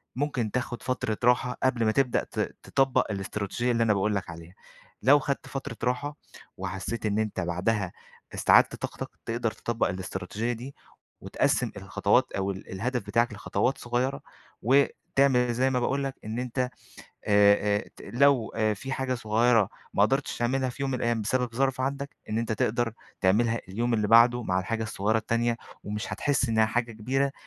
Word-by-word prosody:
ممكن 125 -5 -1
تاخُد 120 0 -3
فترة 120 -4 -1
راحة 125 +1 +3
قبل 125 -3 +2
ما 110 - +3
تبدأ 130 +1 +1
ت - - -7 0.2
تطبِّق 130 -3 +1
الإستراتيجية 100 +4 -2
اللي 115 -1 +2
أنا 110 -2 +3
باقول 105 +1 +1
لك 95 -3 -3
عليها. 85 +1 -11 0.5
لو 140 +5 +7
خدت 140 0 -3
فترة 135 -4 -6
راحة 145 +4 -1 0.4
وحسّيت 95 +4 -4
إن 105 0 +1
أنتَ 110 -3 -2
بعدها 90 +3 -1 0.4
استعَدِّت - - +5
طاقتَك، - - -6 0.2
تقدَر 115 0 -1
تطبِّق 120 +1 -1
الإستراتيجية 95 +5 -3
دي 125 +4 -8 0.5
وتقسّم - - 0
الخطوات - - +1
أو 100 0 -1
ال 95 0 -9
الهدف 120 +5 -2
بتاعَك 115 +2 +1
لخطوات 100 +4 -1
صغيرة، 125 +3 -1 0.4
وتعمل 130 0 +3
زي 130 +3 +2
ما 130 -1 +1
باقول 140 +3 0
لك، 135 -1 -3
إن 110 +2 -3
أنتَ 125 0 -4 0.5
آآ 100 0 +3
آآ - - -10
ت - - -12
لو 130 -2 +2 0.2
في 135 +7 -6
حاجة 130 -1 -1
صغيرة 115 -2 +3 0.3
ما 100 - +4
قدِرتِش 135 +6 +1
تعمَلها 130 +2 +1
في 135 - -7
يوم 135 -1 0
الأيَّام 120 -2 0
بسبَب 125 +2 -1
ظرف 130 +1 +1
عندك، 140 +1 -2 0.2
إن 110 - 0
أنتَ 115 -1 -1
تقدَر 115 +2 0 0.3
تعمَلها 115 +4 +2
اليوم 115 +5 0
اللي 105 -2 +1
بعده 120 +2 +6
مع 95 -4 0
الحاجة 110 +4 -2
الصغيرة 110 0 0
التانية، 115 +1 0 0.3
ومش 105 +1 -4
هتحس 140 -3 +1
إنها 110 -1 +3
حاجة 115 +1 -1
كبيرة، 135 +6 0
115 Hz, 165 wpm, -27 LUFS, 105-130 Hz, 0.5 s, لو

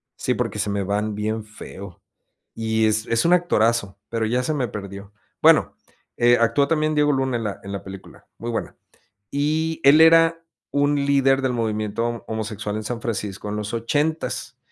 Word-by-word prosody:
sí, - - -1
porque, - - -2
se - - -1
me 100 0 -1
van 105 +2 -1
bien 110 +1 -2
feo 100 -3 -11 0.5
y 110 0 0
es 110 +1 0
es 115 +4 +1
un 170 - +5
actorazo, 115 - +1
pero, 115 -1 -1
ya 120 +3 0
se 155 - -1
me 130 -5 -1
perdió. 100 -1 -8 0.3
Bueno, - - +5 0.4
eh, 120 0 +5
actuó 115 +5 +2
también 155 -1 +1
Diego 150 0 +3
Luna 135 -2 0
en 115 - -4
la 105 -2 -4
en 100 0 -7
la 100 - -5
película, 95 -1 -11
muy 120 +1 -5
buena. 115 - -4 0.5
Y 155 +3 0
él 145 +3 +7
era 165 0 +5 0.3
un 145 +1 +2
líder 135 -1 +3
del 130 -2 0
movimiento 115 +1 -2
homosexual 105 -1 -4
en 110 - -4
San 115 +2 -4
Francisco 105 -3 -4
en 105 - -3
los 105 +1 -5
ochentas 145 +8 -2
115 Hz, 180 wpm, -22 LUFS, 105-140 Hz, 0.5 s, él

